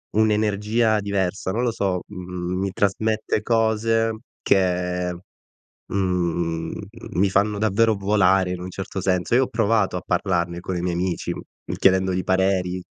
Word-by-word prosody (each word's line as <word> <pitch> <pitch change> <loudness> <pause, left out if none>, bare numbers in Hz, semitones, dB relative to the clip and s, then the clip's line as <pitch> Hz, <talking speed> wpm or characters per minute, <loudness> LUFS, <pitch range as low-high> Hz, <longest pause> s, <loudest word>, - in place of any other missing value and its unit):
un'energia 110 +1 +2
diversa, 100 -2 -1
non 115 +5 -1
lo 120 -2 +1
so. 95 -4 -1
Mh 105 - -12
mhmm, 90 0 -4
mi 95 -1 -1
trasmette 110 +2 0
cose 115 0 +2 0.3
che, 90 -1 +1 0.8
mhmm, 85 -3 -1 0.4
mi 95 +3 +2
fanno 100 +2 +1
davvero 110 +1 +3
volare 95 -2 +3
in 90 - -4
un 90 0 -6
certo 95 +1 -5
senso. 90 +4 +1
Io 130 - +5
ho - - -2
provato 110 -4 +1
a - - -5
parlarne 85 -2 0
con 95 +1 -4
i - - -2
miei 90 -1 -1
amici 90 -1 -2 0.5
chiedendogli 95 -1 +3
pareri 95 -1 +1
95 Hz, 145 wpm, -23 LUFS, 90-105 Hz, 0.8 s, Io